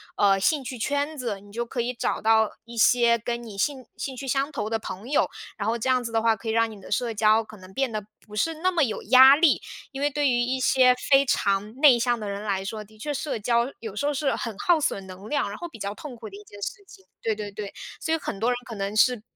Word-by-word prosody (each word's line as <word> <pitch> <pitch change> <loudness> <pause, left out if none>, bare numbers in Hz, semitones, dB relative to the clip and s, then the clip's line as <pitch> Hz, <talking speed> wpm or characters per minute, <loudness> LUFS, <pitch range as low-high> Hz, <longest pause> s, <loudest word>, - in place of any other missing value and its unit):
呃， 195 -1 +4
兴 285 +7 +1
趣 255 0 -6
圈 285 +5 -1
子， 225 -6 -4
你 205 0 -16
就 235 +2 -3
可 240 +1 -3
以 245 +2 -2
找 240 - -2
到 220 0 +4
一 235 +1 -11
些 235 +1 +5
跟 235 +1 -4
你 215 -4 -9
兴 260 +4 -1
兴 265 -2 -4
趣 270 - -7
相 270 +2 0
投 270 -8 -4
的 225 0 -1
朋 215 +3 -7
友， 290 - +2 0.3
然 205 - -3
后 230 - +1
这 245 +3 -2
样 255 -1 +3
子 230 - -5
的 225 - +2
话， 225 0 +4
可 220 +2 -11
以 220 - +1
让 230 0 +2
你 210 - -11
的 - - -13
社 230 +2 0
交 215 +1 +4
可 215 -1 -13
能 185 0 -14
变 270 0 0
得 215 -2 -4 0.2
不 210 0 -10
是 325 +8 +1
那 365 +4 +1
么 340 -4 +2
有 220 - -4
压 260 +3 +8
力。 310 0 +3 0.3
因 270 - -7
为 290 - +2
对 290 -1 +1
于 240 - +2
一 250 +2 0
些 255 -1 +5
非 275 0 +6
常 205 -2 0
内 270 -3 +6
向 240 0 +1
的 210 -2 -5
人 200 0 -4
来 195 -2 -1
说， 215 +2 -5
的 215 +1 -20
确 290 +7 -4
社 285 -3 -3
交 235 +3 +1
有 220 -3 -7
时 210 - -2
候 295 - +1
是 280 -1 0
很 225 -4 -4
耗 340 - +3
损 195 -9 -1
能 190 +2 -10
量， 295 - 0
然 - - -7
后 345 - -6
比 245 - -12
较 200 -1 -4
痛 280 +1 -9
苦 225 -2 -9
的 200 - -11
一 210 - -12
件 205 - -13
事 - - -3
情， 190 - -16 0.2
对 220 -1 0
对 205 -1 -6
对。 200 0 -7 0.3
所 320 0 0
以 - - -1
很 200 - -5
多 230 +3 +1
人 250 - +2
可 230 - -7
能 200 +1 -3
是， 245 0 +4
235 Hz, 300 characters per minute, -25 LUFS, 210-265 Hz, 0.3 s, 压